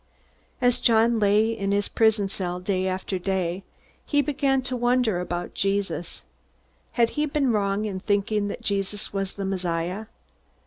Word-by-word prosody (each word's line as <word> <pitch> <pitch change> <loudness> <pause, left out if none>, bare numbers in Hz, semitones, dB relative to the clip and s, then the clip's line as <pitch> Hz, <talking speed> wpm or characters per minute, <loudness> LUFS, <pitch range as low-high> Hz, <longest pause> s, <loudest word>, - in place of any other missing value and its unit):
As 245 0 +3
John 230 -1 +4
lay 215 +2 +3
in 200 -2 -2
his 200 0 +1
prison 220 -3 +2
cell 180 -2 -3
day 185 0 -1
after 185 0 -2
day, 185 0 -1 0.4
he 290 -1 +2
began 270 -1 +1
to 250 0 -2
wonder 240 -5 +2
about 175 0 -4
Jesus. 195 -4 -2 0.7
Had 235 -2 +3
he 300 0 0
been 280 -3 +1
wrong 205 -1 0
in 195 -3 -3
thinking 205 +1 0
that 200 - -6
Jesus 200 0 -2
was 195 -1 -2
the 200 - -4
Messiah? 185 +2 -2
200 Hz, 150 wpm, -25 LUFS, 190-230 Hz, 0.7 s, John